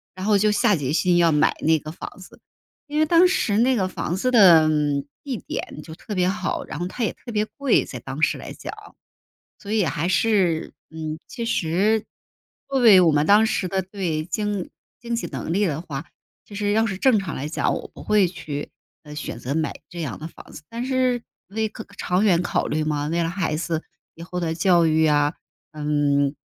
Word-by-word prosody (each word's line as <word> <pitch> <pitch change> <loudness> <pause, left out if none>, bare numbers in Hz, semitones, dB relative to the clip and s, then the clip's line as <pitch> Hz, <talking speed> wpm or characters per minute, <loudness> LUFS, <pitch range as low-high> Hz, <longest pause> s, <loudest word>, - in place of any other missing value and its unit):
然 185 +1 -5
后 210 -2 +4
就 210 +1 +3
下 210 -1 +3
决 140 -3 -2
心 175 +2 +2
要 170 -1 +4
买 150 +1 +3
那 160 0 +3
个 155 +2 -8
房 - - -8
子。 185 - -14 0.5
因 295 +1 -4
为 310 - +4
当 340 +3 +6
时 215 - +1
那 255 +2 +4
个 190 -4 +1
房 175 -1 -3
子 255 +6 0
的， 175 -9 +7
嗯， 145 -2 +1 0.2
地 265 -5 -3
点 150 - -6
就 160 - -10
特 205 +4 -7
别 180 0 +2
好， 190 -1 -2
然 - - -7
后 175 - -2
它 235 +5 -4
也 - - 0
特 240 - -10
别 210 0 +1
贵- 280 +4 +1
在 - - -7
当 - - -7
时 - - +2
来 - - -8
讲。 - - -7 0.9
所 205 +1 -5
以 215 -3 +3
还 160 +2 -1
是， 185 -4 +1 0.2
嗯， 160 0 -5
其 235 - -6
实 205 +3 +1 0.6
作 270 -1 +1
为 210 -6 +8
我 165 -3 +5
们 145 +1 +2
当 210 +2 +6
时 185 -4 -1
的， 190 +1 -1
对 180 -5 -3
经 205 +1 -3 0.3
经 235 0 -4
济 230 - -3
能 - - -5
力 200 +3 +2
的 155 -2 -2
话， 150 -3 -6 0.4
其 205 - -12
实 205 0 0
要 220 +2 +3
是 195 -4 -3
正 235 -2 +4
常 180 -5 -5
来 145 +3 -4
讲， - - 0
我 - - -7
不 - - -11
会 210 -3 +3
去， 150 -4 -6 0.3
呃， 150 0 -10
选 150 -5 -5
择 130 +3 -3
买 160 -2 -1 0.2
这 175 - -8
样 140 -8 -4
的 160 - -6
房 - - -15
子。 - - -10
但 235 +2 -4
是 255 -2 +1 0.3
为 220 +2 -1
考 220 - -9
长 180 +3 +1
远 180 -4 +4
考 - - -1
虑 155 0 -1
嘛， 150 -1 -1
为 170 +2 0
了 165 - -1
孩 175 -4 -1
子 165 0 -2 0.3
以 165 - -9
后 180 +1 -5
的 165 -2 -1
教 175 -1 +4
育 160 0 +3
呀， 145 -1 +2 0.4
嗯， 145 -2 +1
180 Hz, 235 characters per minute, -23 LUFS, 155-210 Hz, 0.9 s, 为